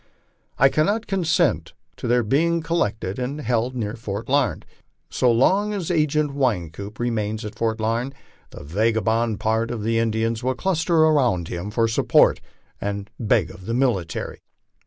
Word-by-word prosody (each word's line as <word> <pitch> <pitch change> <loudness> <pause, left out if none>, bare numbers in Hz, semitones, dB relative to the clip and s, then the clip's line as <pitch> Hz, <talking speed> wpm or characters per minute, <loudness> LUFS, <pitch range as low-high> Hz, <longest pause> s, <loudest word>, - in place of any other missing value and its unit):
I 135 - +6
cannot 205 +11 +1
consent 180 -5 +1 0.2
to - - -5
their 120 0 +3
being 165 +9 +1
collected 115 - -1
aud 135 +4 -3
held 120 +1 -1
near 110 -4 -3
Fort 110 -2 -5
Lamed. 135 -3 +1 0.5
So 125 - +3
long 195 - +2
as 185 -3 -3
Agent 150 -2 +1
Wynkoop 100 - -2
remains 110 -2 -2
at 105 - -6
Fort 115 -1 -1
Larned 115 +5 -1 0.3
the - - -11
vagabond 110 +5 0
part 110 +1 0
of 115 -3 -4
the 115 +1 +1
Indians 115 0 0
will 130 +1 -1
cluster 165 0 +2
about 125 - +2
him 90 +4 -4
for 115 +2 +1
support, 115 - +3 0.4
and 100 0 -3
to - - -31
beg 105 -5 +2
of 90 - -13
the 115 - -1
military. 115 -10 -1
115 Hz, 155 wpm, -23 LUFS, 110-140 Hz, 0.5 s, I